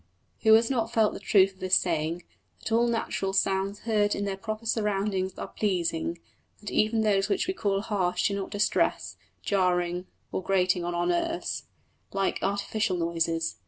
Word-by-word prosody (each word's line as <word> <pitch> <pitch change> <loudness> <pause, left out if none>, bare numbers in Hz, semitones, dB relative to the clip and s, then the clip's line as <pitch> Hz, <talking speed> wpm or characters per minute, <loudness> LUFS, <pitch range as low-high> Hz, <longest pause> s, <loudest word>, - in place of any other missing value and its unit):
Who 220 -1 +7
has 230 +3 +3
not 230 -3 0
felt 220 -3 +3
the - - -6
truth 195 -1 +4
of 190 - -26
this 185 0 +2
saying, 165 0 0 0.4
that - - -6
all 235 +1 +3
natural 225 -4 -1
sounds 195 +1 0
heard 210 -2 +1
in 200 - -2
their 195 -1 -2
proper 215 +3 -6
surroundings 200 -4 -1
are - - -5
pleasing; 170 -4 -1 0.4
that 210 - -7
even 220 +1 +2
those 200 -2 +2
which 360 - +1
we 375 - -1
call 200 - 0
harsh 185 -4 0
do 200 - -2
not 195 -1 -4
distress, 205 0 0 0.3
jarring 180 -2 0 0.2
or - - -2
grating 185 -1 +1
on 175 0 -2
our 175 0 0
nerves, 330 - -1 0.5
like 195 -1 0
artificial 200 0 -1
noises! 165 - -1
195 Hz, 170 wpm, -27 LUFS, 180-215 Hz, 0.5 s, Who